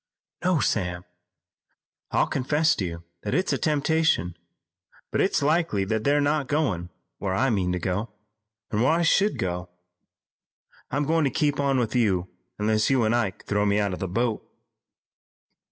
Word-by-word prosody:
"No, 180 -3 +2
Sam. 90 -7 -1 1.0
I'll - - +2
confess 150 +4 +1
to - - -1
you 85 -1 -6 0.2
that - - -2
it's 185 +2 +1
a - - +1
temptation, 150 - +1 0.8
but - - +1
it's - - +1
likely 150 - +1
that 110 +2 -1
they're 145 +1 +3
not 145 -1 +1
going 105 - -1 0.3
where 95 -2 -1
I 130 +5 +2
mean 95 -4 0
to - - -1
go, 95 +5 -2 0.6
and 105 - 0
where 130 +6 +4
I 170 +1 +2
should 195 +5 +3
go. 90 -1 -3 1.2
I'm 145 +2 0
going 160 +1 +2
to - - +3
keep 145 +2 0
on 140 -1 +2
with 120 -1 -1
you 95 -7 +1 0.3
unless 110 0 +1
you 130 -3 +3
and 110 +1 +2
Ike 110 -5 -2
throw 105 0 +1
me 100 0 +2
out 100 -2 0
of - - -5
the 95 - -2
boat." 115 +4 -1
115 Hz, 170 wpm, -25 LUFS, 95-145 Hz, 1.2 s, where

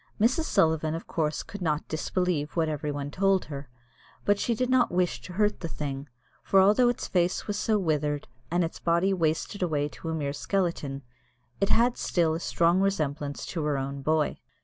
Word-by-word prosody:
Mrs. 255 +9 +3
Sullivan 160 - +2
of 165 - -6
course 155 -2 -1
could 205 - -9
not 155 -3 -1
disbelieve 160 -1 -1
what 165 -2 +2
every 150 -1 -2
one 145 0 -4
told 195 +2 +2
her, 140 -2 -7 0.6
but 205 0 +3
she 235 - +1
did 255 +3 0
not 255 -1 +3
wish 175 -9 0
to 155 +9 -9
hurt 210 +2 +1
the 170 - -4
thing; 140 -2 -5 0.3
for 195 - +4
although 210 +6 +5
its 245 - -2
face 180 0 +1
was 205 - -2
so 215 +1 +1
withered, 150 -5 0 0.2
and 175 +1 +2
its 165 - -4
body 170 +3 +2
wasted 165 +3 -1
away 150 -5 +1
to 165 - -7
a 160 - -1
mere 140 -3 -2
skeleton, 150 -6 -2 0.6
it 195 - +1
had 240 +1 +3
still 165 -3 +1
a 160 - -2
strong 170 +1 +2
resemblance 145 -8 -1
to 165 -4 -3
her 150 -2 +1
own 135 +1 -4
boy. 155 +1 +1
165 Hz, 195 wpm, -27 LUFS, 150-195 Hz, 0.6 s, although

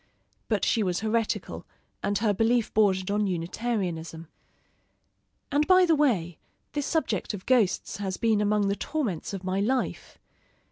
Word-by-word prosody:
But - - +1
she 230 - +2
was 180 -3 0
heretical, 220 0 -2 0.3
and 205 - 0
her 210 -1 +1
belief 225 +3 +1
bordered 195 -3 +2
on 205 0 +1
Unitarianism. 175 -3 -3 1.3
And 290 +1 +2
by 370 -1 +6
the 335 - +3
way, 210 - +1 0.3
this 290 -1 -2
subject 225 - -1
of 185 - -10
ghosts 230 -9 +1
has 195 -2 -3
been 220 -3 +2
among 210 -1 +2
the 200 - +1
torments 240 - -3
of 195 -2 -6
my 185 +1 -1
life. 250 +5 -2
210 Hz, 145 wpm, -27 LUFS, 185-240 Hz, 1.3 s, by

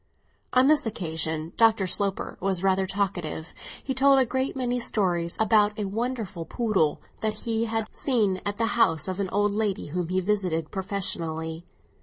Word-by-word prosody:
On 255 +1 +5
this 295 -3 +4
occasion 160 -4 -3
Dr. 225 -3 +4
Sloper 200 +2 -1
was 190 -1 0
rather 190 0 +2
talkative. 180 -5 -3 0.3
He 265 - -2
told 275 +1 +5
a 265 - +4
great 260 +3 -1
many 250 -1 -1
stories 175 -7 0
about 215 -1 +3
a 210 - -2
wonderful 215 -3 -3
poodle 195 -7 0 0.2
that 215 -1 -2
he 225 -1 0
had 225 -1 -1
seen 210 -9 +1
at 205 0 -3
the 230 - +1
house 175 -10 +2
of 185 +1 -3
an 195 -2 -1
old 205 +1 +1
lady 205 -5 -1
whom 175 +2 -2
he 185 +2 0
visited 180 -5 -1
professionally. 170 -4 -3
200 Hz, 165 wpm, -26 LUFS, 175-225 Hz, 0.3 s, On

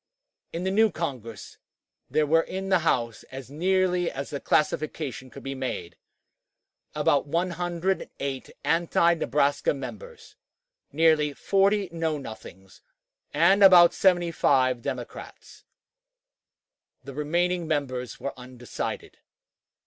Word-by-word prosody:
In 170 - -4
the 190 - 0
new 220 +3 +4
Congress 125 - -6 0.5
there 155 - +2
were 165 +2 +4
in 190 +3 -5
the 185 -2 +4
House, 120 -8 0
as 130 0 -9
nearly 180 +2 +1
as 140 +2 -6
the 140 - -3
classification 150 -4 -1
could - - -12
be 135 - -4
made, 130 -10 -5 1.0
about - - +2
108 170 -4 -2
anti 170 0 +2
Nebraska 145 -3 +1
members, 465 - -9 0.6
nearly 155 -2 +3
40 195 +3 +1
Know 165 -2 -1
Nothings, 95 -7 -11 0.5
and 170 +7 +4
about 180 -3 +8
75 160 -9 +2
Democrats; - - -8 1.4
the 140 - -9
remaining 170 +4 -1
members 130 -5 -3
were 140 - -4
undecided. 125 -1 -7
155 Hz, 105 wpm, -26 LUFS, 135-180 Hz, 1.4 s, about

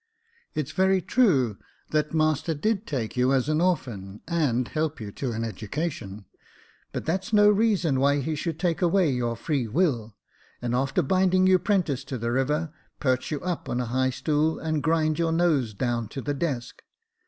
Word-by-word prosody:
It's 155 -1 -2
very 190 +2 +3
true, 150 - +2 0.3
that 150 -1 +1
master 155 0 +1
did 215 +7 -1
take 120 -7 -3
you 125 +1 +2
as 130 0 +1
an 155 +1 +1
orphan, 115 - -2
and 140 -8 +1
help 155 -2 -2
you 105 -3 -6
to 130 +4 -3
an 115 0 -3
education; 110 - -4 0.7
but - - -4
that's 185 +6 -2
no 210 -1 +6
reason 200 -10 +2
why 140 +1 +3
he 155 +3 -2
should 155 +1 -3
take 170 0 0
away 175 -2 +3
your 120 -2 -1
free 125 +1 -1
will, 115 - 0 0.4
and 120 -1 -2
after 135 +7 +1
binding 185 +4 +3
you 185 -1 +5
'prentice 175 - 0
to 135 - -4
the 115 0 -2
river, 150 +5 0 0.3
perch 130 -2 0
you 150 -3 -3
up 180 -2 -3
on 120 - -1
a 125 - -1
high 130 0 +2
stool, 155 +4 0
and 155 -2 -1
grind 160 -1 +1
your 165 -1 +1
nose 160 -8 +2
down 120 0 -1
to 135 - -6
the 145 - -2
desk. 135 -5 -3
150 Hz, 180 wpm, -26 LUFS, 125-170 Hz, 0.7 s, no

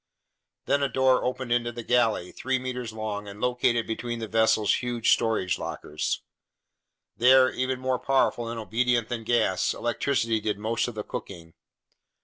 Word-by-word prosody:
Then 140 - +1
a 140 - +1
door 130 +1 +3
opened 125 -1 -3
into 120 0 +1
the 120 0 -7
galley, 115 -7 +1
3 130 +1 -1
meters 125 -2 -4
long 105 -2 -5
and 100 +1 -9
located 120 -1 +1
between 120 +1 -4
the 115 -1 -5
vessel's 110 -1 +3
huge 120 -2 +2
storage 110 -6 0
lockers. 75 +1 -3 0.9
There, 130 +2 +6
even 130 0 -2
more 130 -1 -1
powerful 130 -3 +1
and 115 0 -4
obedient 120 +1 0
than 115 -2 -3
gas, 110 -4 +1
electricity 120 -1 0
did 105 -1 -1
most 110 +4 -1
of 120 - -6
the 105 - -4
cooking. 85 -6 -8
120 Hz, 155 wpm, -26 LUFS, 110-125 Hz, 0.9 s, There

